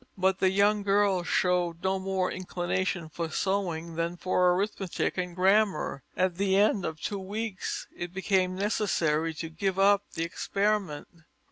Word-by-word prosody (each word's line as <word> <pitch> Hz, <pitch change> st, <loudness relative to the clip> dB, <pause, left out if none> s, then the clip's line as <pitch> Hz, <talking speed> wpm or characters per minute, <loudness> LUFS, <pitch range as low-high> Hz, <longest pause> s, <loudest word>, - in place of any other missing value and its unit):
But 190 Hz, 0 st, +2 dB
the 190 Hz, -, +4 dB
young 205 Hz, +2 st, +3 dB
girl 200 Hz, -2 st, +2 dB
showed 175 Hz, -1 st, 0 dB
no 190 Hz, 0 st, +1 dB
more 190 Hz, -1 st, -1 dB
inclination 180 Hz, -1 st, -2 dB
for 165 Hz, +1 st, -4 dB
sewing 170 Hz, -2 st, -1 dB
than 170 Hz, +1 st, -1 dB
for 180 Hz, 0 st, +2 dB
arithmetic 195 Hz, -1 st, -2 dB
and 180 Hz, -1 st, -3 dB
grammar. 190 Hz, -5 st, +2 dB, 0.2 s
At 185 Hz, -2 st, +1 dB
the 195 Hz, -1 st, +2 dB
end 205 Hz, -1 st, +3 dB
of 160 Hz, -1 st, -4 dB
two 200 Hz, +4 st, -3 dB
weeks 205 Hz, +1 st, -4 dB
it 175 Hz, 0 st, -5 dB
became 185 Hz, -1 st, +1 dB
necessary 165 Hz, -6 st, 0 dB
to 165 Hz, +1 st, -5 dB
give 190 Hz, +3 st, -1 dB
up 200 Hz, +1 st, +4 dB
the 165 Hz, -, -1 dB
experiment. 195 Hz, -2 st, -1 dB
185 Hz, 150 wpm, -28 LUFS, 175-200 Hz, 0.2 s, the